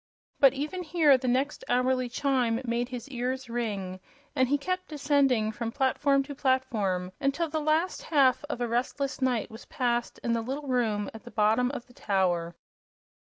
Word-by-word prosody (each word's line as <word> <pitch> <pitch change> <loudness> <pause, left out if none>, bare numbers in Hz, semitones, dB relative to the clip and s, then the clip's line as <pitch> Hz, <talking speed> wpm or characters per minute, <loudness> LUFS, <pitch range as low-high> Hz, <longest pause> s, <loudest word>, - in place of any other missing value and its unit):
But 275 -3 +7
even 300 +7 -3
here 315 -4 +4
the 255 0 -2
next 265 +4 0
hourly 255 0 +1
chime 245 -3 +1
made 240 +1 -1
his 245 -1 -6
ears 255 -1 -3
ring, 200 -6 -3 0.4
and 260 -1 +2
he 290 - +3
kept 365 +5 -3
descending 280 -7 +2
from 230 +1 -4
platform 275 +1 +2
to 285 +1 -7
platform 225 -10 0
until 285 +5 0
the 310 +1 -2
last 315 +4 +1
half 275 -5 +3
of 295 -5 -5
a 240 - +1
restless 265 +4 -2
night 245 -3 0
was 220 +2 -11
passed 240 -4 -1
in 235 - +1
the 230 - 0
little 275 +5 -5
room 225 -5 0
at 225 - -10
the 240 - -10
bottom 225 +3 +2
of 260 -3 -6
the 245 - -20
tower. 175 -6 0
255 Hz, 175 wpm, -28 LUFS, 230-280 Hz, 0.4 s, But